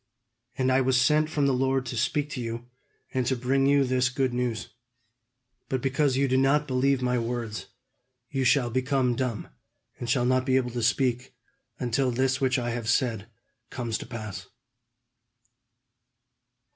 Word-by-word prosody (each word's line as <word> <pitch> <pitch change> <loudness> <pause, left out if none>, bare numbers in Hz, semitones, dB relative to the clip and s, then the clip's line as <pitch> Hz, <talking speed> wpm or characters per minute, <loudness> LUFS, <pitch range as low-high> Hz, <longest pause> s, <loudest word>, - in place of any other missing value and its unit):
"And 130 0 +2
I 130 +1 +4
was 130 0 +3
sent 150 +4 +3
from 150 -3 0
the 135 - +3
Lord 135 0 +1
to 120 - -5
speak 145 +5 0
to 125 - -4
you, 115 +1 -5 0.5
and 130 - +1
to 130 - +2
bring 135 +2 +1
you 140 0 +4
this 130 0 +1
good 130 -1 -1
news. 120 -2 -2 1.0
But 130 - 0
because 135 0 +1
you 140 0 +2
did 130 0 +2
not 145 +3 +3
believe 130 0 +1
my 125 -1 +1
words, 115 -2 -4 0.6
you 135 -2 0
shall 125 -1 +3
become 130 0 +1
dumb, 120 -4 -3 0.5
and 120 - -5
shall 125 0 +2
not 130 +1 +2
be 130 0 +1
able 125 -2 -1
to 120 0 -3
speak, 125 +1 0 0.4
until 125 +2 0
this 130 +2 0
which 130 0 +2
I 120 -1 -2
have 115 -1 -3
said 115 -5 0 0.4
comes 115 -3 -3
to - - -8
pass." 105 -5 -7
130 Hz, 165 wpm, -27 LUFS, 120-135 Hz, 1.0 s, I